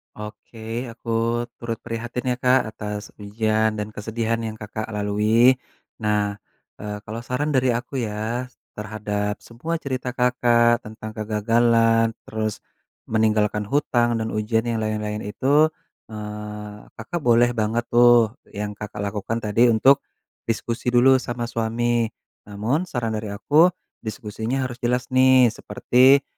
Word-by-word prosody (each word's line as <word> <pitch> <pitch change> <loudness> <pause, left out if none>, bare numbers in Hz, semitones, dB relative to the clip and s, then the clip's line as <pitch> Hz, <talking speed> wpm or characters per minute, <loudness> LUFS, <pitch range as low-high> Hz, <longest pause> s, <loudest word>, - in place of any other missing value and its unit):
Oke 110 +3 -7
aku 115 0 -7 0.5
turut 115 -1 -3
prihatin 120 +2 -3
ya - - +1
Kak 125 -3 +3
atas 105 -1 -6
ujian 110 +1 0
dan 105 0 -4
kesedihan 110 +2 -2
yang 110 -1 -4
Kakak 110 0 -6
lalui, 110 +5 +3 0.4
nah 105 -2 0 0.4
eee, 105 0 -6
kalau 110 +2 -6
saran 125 +5 -2
dari 130 -2 +2
aku 125 +3 -4
ya 110 +4 -3 0.3
terhadap 105 -1 -3
semua 140 +9 -4
cerita 130 -5 -4
Kakak 120 -1 +3
tentang 110 0 -8
kegagalan 115 +1 +2
terus 110 -1 -4 0.5
meninggalkan 105 -1 +1
hutang 120 -2 +1
dan 110 0 -2
ujian 110 +1 0
yang 115 -1 -1
lain-lain 105 -1 -2
itu, 140 +9 +3 0.4
eee, 105 -1 -7 0.2
Kakak 145 +10 -4
boleh 120 -3 +4
banget 115 0 0
tuh 120 -2 +6 0.2
yang 105 0 -3
Kakak 105 0 -6
lakukan 105 +3 -3
tadi 110 +3 +4
untuk 120 +4 +5 0.5
diskusi 115 +1 -3
dulu 130 +2 +6
sama 120 -1 -4
suami, 115 0 0 0.4
namun 115 - -1
saran 120 -7 -2
dari 105 -1 -5
aku 150 - +5 0.3
diskusinya 110 +3 -3
harus 125 -1 -5
jelas 125 +1 -1
nih 130 -2 +6
seperti 130 +4 +3
115 Hz, 130 wpm, -23 LUFS, 105-120 Hz, 0.5 s, tuh